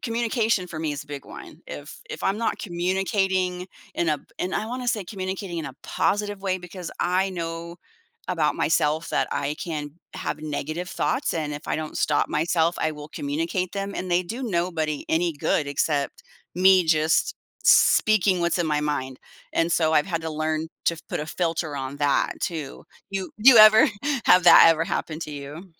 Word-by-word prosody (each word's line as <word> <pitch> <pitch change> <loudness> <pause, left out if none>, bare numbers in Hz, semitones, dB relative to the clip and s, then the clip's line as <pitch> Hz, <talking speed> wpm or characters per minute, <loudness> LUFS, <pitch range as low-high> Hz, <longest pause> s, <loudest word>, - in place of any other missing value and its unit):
communication, 230 -4 0
for 165 -3 -7
me 155 -2 -2
is 140 - -6
a - - -27
big 145 -1 -8
one. - - -11
If - - -9
if - - -7
I'm 195 +2 0
not 230 - -1
communicating 185 0 -1 0.3
in 170 - 0
a 150 - +1 0.2
in 185 - -2
I 215 - -1
wanna 250 +1 -4
say, 215 -4 -1
communicating 190 -2 -5
in 155 - -4
a 135 -1 -9
positive 205 -1 -1
way, 190 -1 -1
because 180 -1 -8
I 185 +2 +1
know 170 -1 -5 0.5
about - - +1
myself, 155 +2 +1
that - - 0
I 145 +1 -2
can 150 -3 -4 0.2
have 150 - -4
negative 155 +3 -4
thoughts, 260 +5 -1
and 150 -2 -2
if 145 +2 -8
I - - 0
don't 155 0 -5
stop 150 - +1
myself, 165 +2 +1
I 155 - 0
will 150 0 -9
communicate 285 - -2
them, 200 0 -3
and 185 0 -4
they 175 +1 +3
do 230 +9 -6
nobody 170 - -1
any 170 +1 +1
good 145 +1 0
except 140 0 -1 0.3
me 185 0 +5
just 160 0 +2 0.3
speaking 200 -4 +4
what's 170 +1 +1
in 170 - 0
my 150 -1 +1
mind, 135 -3 -3 0.3
and 165 +1 +1
so 160 -1 +2
I've 150 +1 +3
had 165 -3 -2
to 160 - -3
learn 155 +1 -2 0.2
to 170 -2 +1
put - - -3
a 150 - -5
filter 165 -2 -2
on 135 +1 -5
that, 145 -1 +2
too. 155 -5 -4 0.3
You 195 -1 -4
you 240 +3 +8
ever 215 +1 +9 0.4
have 180 - +6
that 175 - +9
ever 165 0 +1
happen 155 -1 -3
to 155 - -5
you? 145 +5 -8
170 Hz, 185 wpm, -24 LUFS, 155-190 Hz, 0.5 s, ever